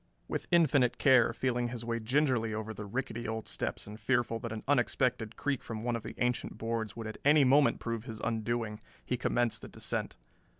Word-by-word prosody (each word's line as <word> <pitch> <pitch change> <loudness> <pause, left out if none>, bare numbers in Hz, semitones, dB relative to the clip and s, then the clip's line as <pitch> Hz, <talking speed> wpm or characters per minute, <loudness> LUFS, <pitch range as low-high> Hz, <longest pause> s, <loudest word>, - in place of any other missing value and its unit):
With - - -3
infinite 145 -8 +4
care, 130 -4 +5
feeling 120 0 0
his 120 -1 -6
way 115 0 -1
gingerly 120 -2 +1
over 110 0 -4
the 105 0 -7
rickety 120 +1 -3
old 110 0 -4
steps - - -3
and 105 +1 -9
fearful 120 -3 +1
that 115 -1 -5
an 110 -1 -5
unexpected 125 -4 +1
creak 140 -3 -1
from 110 -1 -6
one 120 0 0
of 115 - -3
the - - -8
ancient 125 0 -1
boards 115 -1 -3
would 115 - -6
at 110 - -6
any 145 +1 +6
moment 140 +2 +4
prove 115 -1 -3
his 110 -4 -6
undoing, 115 -1 -2 0.2
he 125 - 0
commenced 120 -1 +1
the - - -8
descent. - - -3
120 Hz, 200 wpm, -31 LUFS, 110-125 Hz, 0.2 s, any